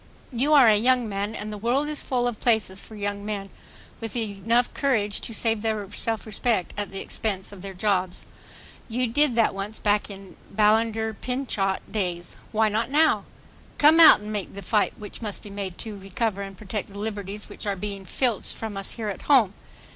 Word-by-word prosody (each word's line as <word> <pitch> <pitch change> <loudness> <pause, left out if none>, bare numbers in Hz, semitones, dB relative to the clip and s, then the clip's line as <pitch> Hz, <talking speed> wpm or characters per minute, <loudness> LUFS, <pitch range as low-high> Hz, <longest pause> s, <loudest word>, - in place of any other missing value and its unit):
You 270 +6 +2
are 270 -5 +8
a 215 - +7
young 245 +2 +3
man 205 +2 -3
and 215 -1 -5
the 210 - -6
world 250 +7 +1
is 300 -1 +1
full 245 -2 0
of 240 -3 -3
places 220 -5 +1
for 220 - -12
young 205 -1 -3
men 205 -2 -4 0.5
with 225 -2 -5
courage 225 -3 -1
enough 235 +2 +2
to 225 -6 0
save 225 -1 +1
their 215 -2 -1
self 225 +1 -3
respect 215 -2 -1
at 205 -1 -3
the 195 - -5
expense 195 -3 -3
of 200 -3 -11
their 195 0 -7
jobs. 185 -2 0 0.6
You 250 +3 0
did 260 +2 +2
that 230 -1 +3
once, 200 +2 -5
back 205 0 +1
in 195 -1 -9 0.2
the - - -16
Ballinger 220 +1 +3
Pinchot 215 -5 -1
days. 180 -4 -3
Why 220 0 +3
not 220 +3 0
now? 310 +3 +3 0.5
Come 310 +3 +6
out 325 -9 +9
and 210 +1 -5
help 200 - -2
make - - -18
the 200 - -7
fight 210 -2 +1
which 210 +2 -9
must 210 -3 -3
be 205 - -10
made 195 -3 -5
to 220 -2 -6
recover 200 +1 -2
and 195 -1 -7
protect 210 0 -5
the 200 - -11
liberties 205 -1 -4
which - - -8
are 200 - 0
being 200 0 -5
filched 235 +2 -1
from 220 -3 -5
us 195 - -1
here 220 -3 -4
at 200 - -5
home. 235 -9 +5
215 Hz, 205 wpm, -25 LUFS, 200-230 Hz, 0.6 s, out